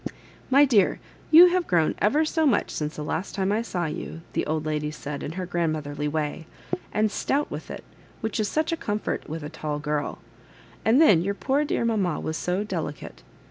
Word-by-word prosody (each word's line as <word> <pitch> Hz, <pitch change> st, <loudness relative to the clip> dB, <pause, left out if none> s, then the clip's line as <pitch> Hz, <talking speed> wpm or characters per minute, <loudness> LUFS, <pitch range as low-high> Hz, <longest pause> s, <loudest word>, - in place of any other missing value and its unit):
"My 275 Hz, +2 st, +7 dB
dear, 215 Hz, -8 st, +3 dB, 0.3 s
you 345 Hz, +3 st, +9 dB
Have 360 Hz, -1 st, 0 dB
grown 165 Hz, -3 st, +2 dB
ever 290 Hz, +10 st, +3 dB
so 315 Hz, 0 st, +1 dB
much 235 Hz, -7 st, +2 dB
since 150 Hz, 0 st, -3 dB
the 150 Hz, -, -5 dB
last 160 Hz, +5 st, -3 dB
tune 195 Hz, 0 st, 0 dB
I 215 Hz, +2 st, +1 dB
saw 180 Hz, -7 st, -2 dB
you," 160 Hz, +1 st, -5 dB
the -, -, -1 dB
old 155 Hz, 0 st, -1 dB
lady 150 Hz, -1 st, -1 dB
said 150 Hz, -2 st, -6 dB
in 155 Hz, -, -5 dB
her 185 Hz, +1 st, -4 dB
grandmotherly 155 Hz, -4 st, -2 dB
way, 155 Hz, +2 st, -3 dB, 0.2 s
'* -, -, -6 dB
and* 215 Hz, 0 st, +1 dB
stout 285 Hz, +7 st, -1 dB
with -, -, -6 dB
it, -, -, -7 dB, 0.4 s
which 220 Hz, -1 st, -3 dB
is 215 Hz, -, +1 dB
such 310 Hz, +2 st, 0 dB
a 330 Hz, -, 0 dB
com 210 Hz, -8 st, -2 dB
fort 215 Hz, -, -4 dB
with 160 Hz, 0 st, -5 dB
a 150 Hz, -, -5 dB
tall 150 Hz, -1 st, -4 dB
girl; 150 Hz, 0 st, -2 dB, 0.7 s
and 230 Hz, +5 st, +4 dB
then 205 Hz, -, +6 dB
your 200 Hz, +3 st, -1 dB
poor 275 Hz, +6 st, +1 dB
dear 290 Hz, -5 st, -1 dB
mamma 200 Hz, -8 st, 0 dB
was 160 Hz, -, -3 dB
so 180 Hz, +4 st, -1 dB
delicate. 160 Hz, -, -5 dB
180 Hz, 210 wpm, -25 LUFS, 155-230 Hz, 0.7 s, you